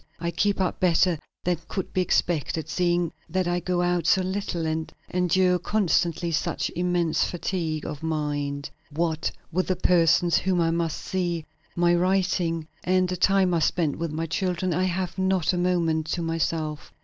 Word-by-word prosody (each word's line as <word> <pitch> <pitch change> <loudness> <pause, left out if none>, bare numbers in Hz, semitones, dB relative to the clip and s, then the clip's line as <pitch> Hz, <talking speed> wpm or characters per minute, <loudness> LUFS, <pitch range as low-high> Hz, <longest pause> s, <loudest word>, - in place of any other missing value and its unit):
I 170 0 -2
keep 200 +3 +1
up 185 -2 0
better 175 -2 +3 0.2
than 175 -2 0
could 190 - -4
be 185 - +2
expected, 165 -3 0
seeing 175 -2 +1 0.2
that 185 +1 0
I 175 0 +1
go 175 0 0
out 175 -2 +1
so 190 - +4
little 185 -3 -2
and 160 0 -2 0.2
endure 180 0 +3
constantly 175 -3 +1
such 165 +2 -1
immense 175 -2 +1
fatigue 165 -3 -2
of 145 - -5
mind. 145 -3 -2 0.2
What 160 +1 -1 0.2
with 185 +2 0
the 185 - +1
persons 175 -1 +4
whom 185 -2 +1
I 165 -1 +2
must 165 -1 -1
see, 175 -4 -2 0.3
my 175 0 +3
writing, 175 -3 +1 0.2
and 185 0 +2
the 180 - -1
time 190 -1 +3
I 170 - +2
spend 155 -1 +1
with 165 -1 -3
my 160 +2 -2
children, 180 +1 -1
I 180 +3 +1
have 185 +1 -2
not 190 -3 +2
a - - 0
moment 165 -3 +1
to 175 - -2
myself. 160 -2 -2
175 Hz, 170 wpm, -25 LUFS, 165-185 Hz, 0.3 s, so